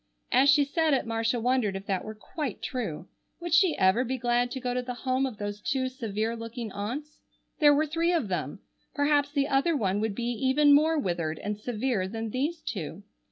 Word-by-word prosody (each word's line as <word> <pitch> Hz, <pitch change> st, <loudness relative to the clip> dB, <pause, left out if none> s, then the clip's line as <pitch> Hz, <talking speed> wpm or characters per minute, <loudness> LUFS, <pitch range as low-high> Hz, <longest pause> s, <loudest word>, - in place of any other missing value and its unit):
As 265 Hz, +3 st, +5 dB
she 285 Hz, +1 st, +6 dB
said 315 Hz, 0 st, +2 dB
it 260 Hz, -, -1 dB
Marcia 225 Hz, +1 st, 0 dB
wondered 240 Hz, -4 st, +1 dB
if 195 Hz, 0 st, -6 dB
that 190 Hz, -2 st, -1 dB
were 215 Hz, -, -7 dB
quite 265 Hz, +3 st, -5 dB
true. 230 Hz, -, -4 dB, 0.3 s
Would 345 Hz, -1 st, -4 dB
she 335 Hz, -1 st, +4 dB
ever 190 Hz, +6 st, +4 dB
be 260 Hz, +1 st, -2 dB
glad 245 Hz, 0 st, +1 dB
to 265 Hz, -, -5 dB
go 250 Hz, -1 st, -2 dB
to 250 Hz, -, 0 dB
the 250 Hz, 0 st, -5 dB
home 260 Hz, +2 st, 0 dB
of 240 Hz, -5 st, -8 dB
those 205 Hz, 0 st, -5 dB
two 260 Hz, +1 st, -1 dB
severe 225 Hz, -2 st, -3 dB
looking 230 Hz, -1 st, -6 dB
aunts? 260 Hz, +11 st, -5 dB, 0.4 s
There 295 Hz, -2 st, +7 dB
were 305 Hz, +2 st, +2 dB
three 330 Hz, +3 st, 0 dB
of 330 Hz, -11 st, +1 dB
them. 170 Hz, -3 st, -3 dB, 0.3 s
Perhaps 285 Hz, 0 st, +2 dB
the 280 Hz, -2 st, +1 dB
other 290 Hz, +4 st, +2 dB
one 200 Hz, -3 st, 0 dB
would 220 Hz, -2 st, -1 dB
be 240 Hz, -, -4 dB
even 265 Hz, +5 st, +4 dB
more 315 Hz, +3 st, +4 dB
withered 170 Hz, -, -1 dB
and 210 Hz, 0 st, -3 dB
severe 215 Hz, -2 st, -2 dB
than 225 Hz, +2 st, -5 dB
these 300 Hz, +7 st, -2 dB
two. 190 Hz, -1 st, -5 dB
245 Hz, 205 wpm, -28 LUFS, 210-285 Hz, 0.4 s, There